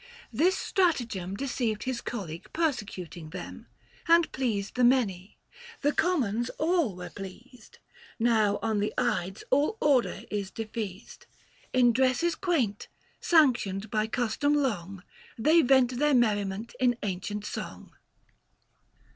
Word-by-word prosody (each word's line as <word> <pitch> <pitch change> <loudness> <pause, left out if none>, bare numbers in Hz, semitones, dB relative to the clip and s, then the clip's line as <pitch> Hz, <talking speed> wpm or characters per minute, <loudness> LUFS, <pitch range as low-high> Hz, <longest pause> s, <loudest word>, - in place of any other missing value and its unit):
This 335 +11 +3
stratagem 235 - 0
Deceived 235 -3 -2
his 255 -2 -3
colleague 170 -9 -6
persecuting 200 - -3
them, 180 +1 -8 0.4
[835 335 - +9
And 340 -1 +1
pleased 220 -7 -2
the 250 - +2
many 215 -7 +2 0.2
— 465 -2 -16
the 290 - +4
Commons 245 - +1
all 315 - +1
were 180 0 -8
pleased. 215 +5 -11 0.4
Now 220 -3 +2
on 220 -2 0
the 210 +1 0
Ides 190 +3 -1
all 290 +11 +2
order 275 -5 +2
is 200 -2 -2
defeased; 215 -2 -7 0.4
In 245 -2 +4
dresses 260 +7 +2
quaint, 290 - -1 0.3
sanctioned 235 - +2
by 215 0 +1
custom 245 +5 0
long, 200 -9 -2 0.3
They 310 +9 +5
vent 255 -2 +3
their 295 -1 +3
merriment 210 -2 0
in 245 -2 +2
ancient 205 +2 -3
song." - - -7
235 Hz, 125 wpm, -28 LUFS, 205-275 Hz, 0.4 s, 835